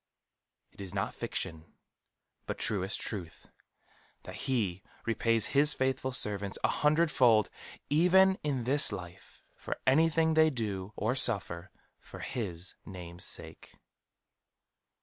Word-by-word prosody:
It - - -13
is 95 0 -7
not 95 - -1
fiction, 80 0 -5 0.7
but - - -3
truest 95 -1 0
truth, 90 -7 -6 0.8
that - - -9
He 100 -9 0 0.2
repays 115 -1 +2
his 145 +1 +3
faithful 130 0 0
servants 100 -5 -1
an - - +3
hundred 155 +2 +2
fold, 115 -6 +4 0.4
even 190 +5 +5
in 140 -5 -1
this 140 +3 +2
life, 90 -3 -9
for - - -5
anything 160 +3 +4
they 160 0 +5
do 105 -7 -4
or 110 +3 0
suffer 95 - 0 0.3
for - - -11
his 95 -7 -4
name's 90 -1 -6
sake. - - -2
115 Hz, 120 wpm, -31 LUFS, 95-145 Hz, 0.8 s, even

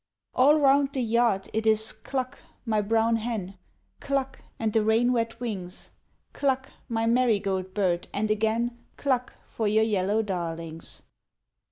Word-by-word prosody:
All 285 +4 +5
round 280 -1 +4
the 265 - -1
yard 230 -4 +2
it 220 +1 0
is 220 0 +3
cluck, 260 0 -4 0.3
my 215 -2 +1
brown 225 +2 +2
hen, 210 -5 -4 0.4
Cluck, 275 -1 -2 0.2
and 220 -2 -1
the 220 - +3
rain 230 +3 +3
wet 230 -1 -1
wings, 195 -7 -4 0.4
Cluck, 265 -2 0 0.2
my 225 -1 0
marigold 200 -6 +1
bird, 180 -4 +1
and 215 +1 -1
again 225 +3 0 0.2
Cluck 255 -3 0
for 220 - -2
your 215 +1 +4
yellow 210 0 +1
darlings. 165 -4 -5
225 Hz, 140 wpm, -27 LUFS, 205-245 Hz, 0.4 s, All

